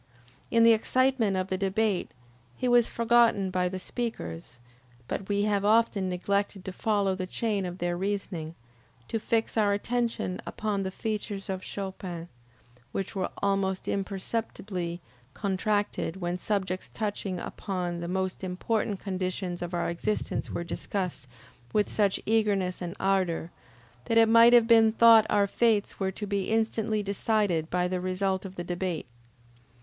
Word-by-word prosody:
In 230 0 +4
the 230 0 +8
excitement 240 -3 +2
of 185 0 -2
the 190 - -1
debate 200 0 0 0.5
he 255 - -2
was 245 -1 +5
forgotten 230 -4 +3
by 180 -1 +1
the 190 - -4
speakers, 120 - -5 0.5
but 195 - -4
we 205 0 +2
have 205 -1 +1
often 210 -3 +3
neglected 200 +1 -1
to 190 - -5
follow 200 -2 +1
the 185 0 -4
chain 205 -2 -1
of 175 0 -6
their 175 -1 -1
reasoning, 180 -4 -3 0.5
to 225 - -1
fix 225 +1 0
our 205 -2 +4
attention 230 -3 -1
upon 210 -2 -2
the 190 - -2
features 205 -1 -4
of 185 -1 -4
Chopin, 185 -3 -6 0.6
which 195 0 -4
were 190 -1 -1
almost 195 -1 0
imperceptibly 195 -3 -3 0.3
contracted 205 -3 -1
when 175 -1 -2
subjects 190 -2 -2
touching 205 -4 -3
upon 180 -2 -4
the 170 - -4
most 190 +1 -2
important 200 +2 -1
conditions 185 -2 -3
of 175 0 -4
our 175 -1 -1
existence 190 +5 -2
were - - -3
discussed 175 -5 -4 0.5
with 210 -1 +2
such 200 -3 +2
eagerness 205 -5 +1
and 175 +1 -4
ardor, 185 -4 0 0.5
that 230 - +1
it 225 0 +7
might 230 +1 +7
have 240 -2 +7
been 225 -1 +6
thought 225 -1 +7
our 200 -1 +4
fates 215 0 +1
were 190 -1 0
to 210 +2 -5
be 200 -2 -1
instantly 220 -1 0
decided 200 -5 0
by 180 0 +1
the 180 0 -2
result 190 +1 -1
of 190 0 -8
the 175 - -4
debate. 175 -2 -3
195 Hz, 150 wpm, -28 LUFS, 185-215 Hz, 0.6 s, the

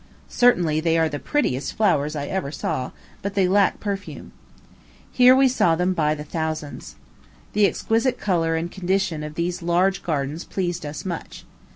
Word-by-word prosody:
Certainly 175 -11 +3
they 165 0 +1
are 160 -1 +3
the 145 -2 -4
prettiest 145 - -1
flowers 155 -8 +1
I 145 -1 -3
ever 175 -4 -3
saw; 130 -3 -3 0.3
but 200 0 -4
they 190 -2 +3
lack 200 +1 +3
perfume. 200 -1 -5 0.8
Here 250 0 +6
we 265 0 +5
saw 180 -10 +2
them 180 +2 +1
by 155 -3 +1
thousands. 155 0 -5 0.6
The 210 -1 +4
exquisite 230 +5 0
order 165 -4 +2
and 165 +2 -3
condition 190 -3 -1
of 150 0 -7
these 175 +1 -2
large 180 +3 +1
gardens 150 0 -2
pleased 175 -4 -3
us 145 +5 -7
much. 175 -3 -6
175 Hz, 160 wpm, -23 LUFS, 155-195 Hz, 0.8 s, Here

